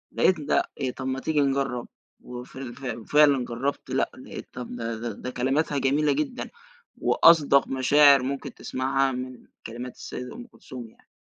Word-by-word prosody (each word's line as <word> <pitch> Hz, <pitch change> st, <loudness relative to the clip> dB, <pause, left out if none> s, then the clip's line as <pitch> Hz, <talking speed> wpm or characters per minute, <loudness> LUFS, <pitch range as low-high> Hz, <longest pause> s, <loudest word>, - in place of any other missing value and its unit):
لقيت 185 Hz, -4 st, +3 dB
ده 145 Hz, -, +2 dB, 0.2 s
إيه، 130 Hz, -2 st, 0 dB
طب 130 Hz, -, -6 dB
ما 130 Hz, 0 st, -2 dB
تيجي 155 Hz, -2 st, +1 dB
نجرب 135 Hz, -3 st, 0 dB, 0.3 s
و 125 Hz, 0 st, -8 dB
ف 130 Hz, -, -13 dB
ف 125 Hz, -1 st, -5 dB
وفعلًا 140 Hz, +2 st, +4 dB
جربت، 125 Hz, +4 st, -3 dB
لأ -, -, 0 dB
لقيت -, -, -9 dB
طب 125 Hz, -1 st, -7 dB
ده 115 Hz, -1 st, -3 dB
ده 115 Hz, -1 st, -4 dB
ده 125 Hz, -, -6 dB
كلماتها 135 Hz, +4 st, 0 dB
جميلة 145 Hz, +3 st, +2 dB
جدًا 285 Hz, -4 st, -3 dB, 0.5 s
وأصدق 150 Hz, -4 st, +5 dB
مشاعر 140 Hz, +1 st, +5 dB
ممكن 135 Hz, 0 st, -4 dB
تسمعها 135 Hz, +1 st, 0 dB
من 125 Hz, 0 st, -7 dB, 0.2 s
كلمات 120 Hz, +2 st, -7 dB
السيدة 125 Hz, 0 st, -7 dB
أم 245 Hz, +1 st, -9 dB
كلثوم 125 Hz, -, -10 dB
يعني، -, -, -27 dB
135 Hz, 165 wpm, -26 LUFS, 125-145 Hz, 0.5 s, وأصدق